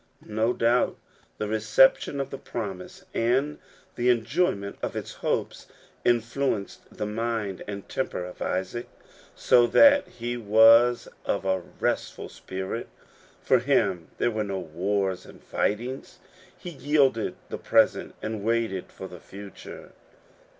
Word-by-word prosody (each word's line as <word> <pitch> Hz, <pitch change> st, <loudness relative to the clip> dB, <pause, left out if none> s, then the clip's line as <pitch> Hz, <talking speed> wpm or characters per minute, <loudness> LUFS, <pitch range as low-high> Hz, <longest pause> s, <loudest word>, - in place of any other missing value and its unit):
No 110 Hz, +2 st, 0 dB
doubt 120 Hz, 0 st, +2 dB, 0.4 s
the 105 Hz, -, -2 dB
reception 110 Hz, +6 st, +3 dB
of 135 Hz, -, -3 dB
the 135 Hz, -, -6 dB
promise, 120 Hz, -, -6 dB
and 130 Hz, +6 st, +1 dB, 0.4 s
the 120 Hz, +1 st, +1 dB
enjoyment 115 Hz, -, 0 dB
of -, -, -3 dB
its -, -, -5 dB
hopes, -, -, -3 dB, 0.4 s
influenced 120 Hz, -2 st, -1 dB
the -, -, -4 dB
mind 110 Hz, -2 st, -2 dB
and 100 Hz, -1 st, -6 dB
temper 90 Hz, -8 st, -3 dB
of 90 Hz, -, -11 dB
Isaac, 95 Hz, +6 st, -2 dB, 0.5 s
so 120 Hz, -1 st, +4 dB
that 285 Hz, -, +6 dB
he 120 Hz, 0 st, -5 dB
was 115 Hz, +2 st, +6 dB, 0.2 s
of -, -, -1 dB
a 95 Hz, -1 st, +1 dB, 0.2 s
restful -, -, -2 dB
spirit. 95 Hz, +5 st, -5 dB, 0.6 s
For 130 Hz, -, +4 dB
him 100 Hz, -, +1 dB
there 120 Hz, -, +1 dB
were 110 Hz, -1 st, -1 dB
no 100 Hz, -2 st, -3 dB
wars 95 Hz, +3 st, -2 dB
and -, -, -14 dB
fightings. 120 Hz, +6 st, -2 dB, 0.4 s
He 175 Hz, -, -8 dB
yielded 140 Hz, -6 st, +1 dB
the -, -, -5 dB
present, -, -, +2 dB
and 110 Hz, -2 st, -4 dB
waited 115 Hz, -4 st, -1 dB
for -, -, -8 dB
the -, -, -11 dB
future. 100 Hz, 0 st, -11 dB
115 Hz, 130 wpm, -26 LUFS, 100-125 Hz, 0.6 s, that